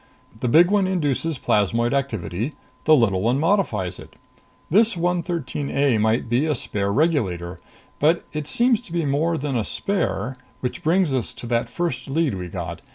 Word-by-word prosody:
The 125 - -1
big 170 +9 +5
one 200 -2 +3
induces 160 -4 0
plasmoid 115 +2 +1
activity, 120 - -2 0.3
the 155 - +7
little 100 -8 +2
one 120 +6 +1
modifies 130 - 0
it. - - -13 0.5
This 215 +3 +3
113 170 -5 -2
A 140 -5 +2
might 110 +3 +1
be 125 +7 +1
a 150 - +1
spare 100 -4 -2
regulator. 95 - 0 0.4
But 160 +4 +2
it 150 -1 -4
seems 235 - +2
to 245 - -15
be 170 -2 0
more 155 +4 +1
than 140 -2 -3
a 115 - +1
spare 175 - -2 0.2
which 125 - -4
brings 165 -2 +2
us 130 -4 -2
to - - -9
that 115 0 0
first 130 -4 -3
lead 150 -2 0
we 90 -2 -5
got. 85 -2 -6
140 Hz, 170 wpm, -23 LUFS, 115-165 Hz, 0.5 s, the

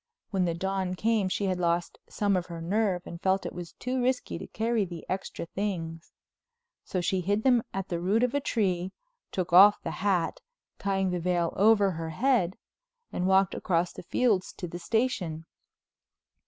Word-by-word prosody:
When 190 -3 +1
the 170 -1 -1
dawn 190 0 -2
came 215 -1 +1
she 200 - -1
had 185 -2 0
lost 170 0 0
some 205 -2 +1
of 180 -1 -1
her 170 -2 -7
nerve 185 +1 0
and 170 0 -8
felt 190 0 +1
it - - -4
was 175 -1 -7
too 255 0 -2
risky 250 +1 -1
to - - -7
carry 225 0 0
the 175 -3 -7
extra 190 -2 -4
things. 165 -4 -4 0.7
So 185 - -2
she 185 +2 0
hid 205 +4 0
them 250 -3 +5
at 195 0 -4
the 170 - -1
root 200 +7 +2
of 250 +1 +1
a 285 - +2
tree, 190 -8 -1 0.4
took 185 -2 -3
off 200 +3 +8
the 165 - -3
hat, 195 - +1 0.4
tying 195 -2 0
the 180 - -1
veil 175 -1 0
over 205 -1 +5
her 165 -1 -4
head, 220 - +1 0.6
and 180 - 0
walked 190 -1 +4
across 175 -1 0
the - - -8
fields 200 0 +1
to 180 - -6
the 175 +1 -7
station. 185 -7 -1
190 Hz, 180 wpm, -28 LUFS, 175-210 Hz, 0.7 s, off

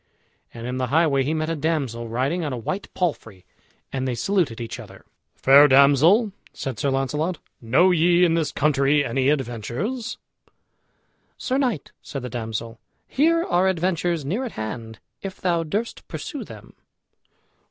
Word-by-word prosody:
And 115 0 -8
in 125 +1 -3
the 130 - 0
highway 145 0 +3
he 145 +4 0
met 155 +1 -1
a - - -1
damsel 140 -7 -2
riding 135 +10 -1
on 150 - -2
a 125 - -3
white 190 - -4
palfrey, 115 - -3 0.5
and 130 -1 -2
they 125 - -1
saluted 170 - 0
each 115 -1 -6
other. - - -12 0.3
"Fair 140 +2 +7
damsel," 145 - +5 0.2
said 130 -5 -5
Sir 140 - +1
Launcelot, 150 +6 -1 0.2
"know 130 +11 +4
ye 175 +1 +4
in 165 - +2
this 165 -3 0
country 145 0 +2
any 130 +2 +1
adventures?" 145 - -2 1.2
"Sir 260 +1 -1
knight," 245 - -1
said 135 -3 -6
the 125 - -4
damsel, 115 -1 -5 0.3
"here 330 +4 +2
are 180 - +2
adventures 175 -3 0
near 200 - -1
at 250 - -5
hand, 110 +1 -6 0.2
if 195 -1 -7
thou 175 -2 +1
durst 205 +9 -4
pursue - - -6
them." - - -12
150 Hz, 155 wpm, -23 LUFS, 125-180 Hz, 1.2 s, Fair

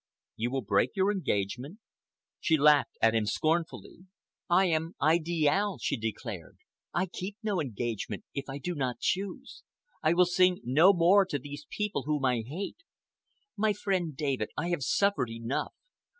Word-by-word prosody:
"You 115 +2 -1
will 135 +1 -2
break 100 - +1
your 195 +1 +2
engagement?" 130 - -2 0.6
She 160 - +2
laughed 150 -1 +4
at 115 0 +5
him 110 -2 +1
scornfully. 165 - -2 0.4
"I 185 +2 +5
am 165 0 -1
Idiale," 165 +5 +2
she - - -1
declared. 110 -3 -6 0.3
"I - - 0
keep 190 +3 -7
no 205 -5 0
engagement 115 -5 -4
if 140 -1 -5
I 135 - -4
do 175 +5 -4
not 130 -6 -2
choose. 200 +8 -3 0.4
I 155 +2 +3
will 180 +1 +6
sing 180 0 +3
no 155 +10 +6
more 190 +2 +5
to 145 - -1
this 145 +2 -9
people 210 -7 -2
whom 150 -3 0
I 125 -3 +2
hate. 160 - -6 0.8
My 215 0 +2
friend 185 -8 -2
David, 135 -8 -1
I 170 - -1
have 175 -4 -1
suffered 140 - +1
enough. 115 +3 -3
155 Hz, 155 wpm, -29 LUFS, 130-185 Hz, 0.8 s, will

